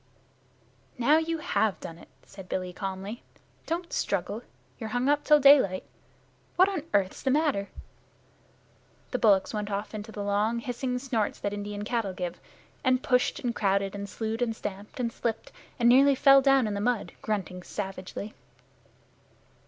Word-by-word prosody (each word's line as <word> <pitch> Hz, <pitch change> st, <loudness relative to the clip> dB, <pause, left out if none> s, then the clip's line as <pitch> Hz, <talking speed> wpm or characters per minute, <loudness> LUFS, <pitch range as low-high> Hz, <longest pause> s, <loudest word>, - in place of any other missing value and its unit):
"Now 285 Hz, +6 st, +4 dB
you 330 Hz, 0 st, -2 dB
have 220 Hz, -9 st, 0 dB
done 165 Hz, 0 st, -8 dB
it," -, -, -15 dB, 0.2 s
said 195 Hz, -2 st, -12 dB
Billy 185 Hz, -1 st, -3 dB
calmly. 195 Hz, +4 st, -5 dB, 0.5 s
"Don't 340 Hz, +1 st, -3 dB
struggle. 200 Hz, +3 st, -1 dB, 0.4 s
You're 220 Hz, -3 st, -5 dB
hung 245 Hz, +3 st, 0 dB
up 290 Hz, +1 st, +2 dB
till 300 Hz, -1 st, +6 dB
daylight. 270 Hz, -10 st, +6 dB, 0.7 s
What 370 Hz, +1 st, +6 dB
on 385 Hz, -5 st, -2 dB
earth's 195 Hz, -2 st, +1 dB
the 270 Hz, -, 0 dB
matter?" 275 Hz, -8 st, +1 dB, 1.4 s
The 250 Hz, -, -1 dB
bullocks 200 Hz, -3 st, +3 dB
went 210 Hz, -1 st, -3 dB
off 205 Hz, +2 st, -3 dB
into 215 Hz, +1 st, -6 dB
the 205 Hz, -1 st, -5 dB
long 205 Hz, +3 st, +1 dB
hissing 250 Hz, +1 st, -3 dB
snorts 245 Hz, -5 st, -1 dB
that 205 Hz, -, -2 dB
Indian 205 Hz, 0 st, -5 dB
cattle 220 Hz, -4 st, -1 dB
give, 180 Hz, -1 st, -5 dB, 0.4 s
and 255 Hz, 0 st, +2 dB
pushed 250 Hz, +3 st, +1 dB
and 245 Hz, -3 st, -1 dB
crowded 195 Hz, -2 st, +1 dB
and 200 Hz, 0 st, -6 dB
slued 225 Hz, +2 st, -3 dB
and 230 Hz, -2 st, 0 dB
stamped 205 Hz, +2 st, -7 dB
and 235 Hz, -2 st, -1 dB
slipped 230 Hz, -2 st, -3 dB, 0.3 s
and 235 Hz, -, +3 dB
nearly 275 Hz, +3 st, +6 dB
fell 275 Hz, +1 st, +7 dB
down 270 Hz, -2 st, +4 dB
in 210 Hz, -, -2 dB
the 200 Hz, -, -2 dB
mud, 240 Hz, 0 st, 0 dB
grunting 190 Hz, -4 st, -3 dB
savagely. 195 Hz, +2 st, -6 dB
220 Hz, 160 wpm, -28 LUFS, 200-255 Hz, 1.4 s, fell